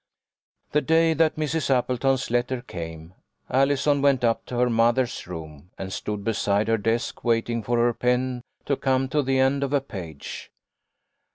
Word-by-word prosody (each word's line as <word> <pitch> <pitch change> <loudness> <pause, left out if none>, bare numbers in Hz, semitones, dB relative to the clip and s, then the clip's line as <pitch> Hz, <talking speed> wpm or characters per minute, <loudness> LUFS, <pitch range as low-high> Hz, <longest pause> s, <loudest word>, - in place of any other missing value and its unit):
The 150 - +3
day 160 +1 +3
that 160 0 +2
Mrs. 155 -1 -1
Appleton's 130 0 +1
letter 120 +1 0
came, 80 0 -8 0.4
Allison 140 +2 +2
went 135 -3 +3
up 115 -1 +1
to 125 - -4
her 125 0 +3
mother's 120 +1 +1
room 80 -2 -9
and 95 0 -5
stood 105 -1 -4
beside 105 0 +1
her 115 -1 +2
desk 115 +3 -1
waiting 115 0 +1
for 120 +3 -1
her 120 0 +3
pen 125 +1 0 0.2
to 140 - +1
come 130 -1 +1
to 150 0 +2
the 135 -1 0
end 135 +1 +2
of 140 +1 -2
a 145 - +4
page. 90 - -8
125 Hz, 165 wpm, -25 LUFS, 115-135 Hz, 0.4 s, a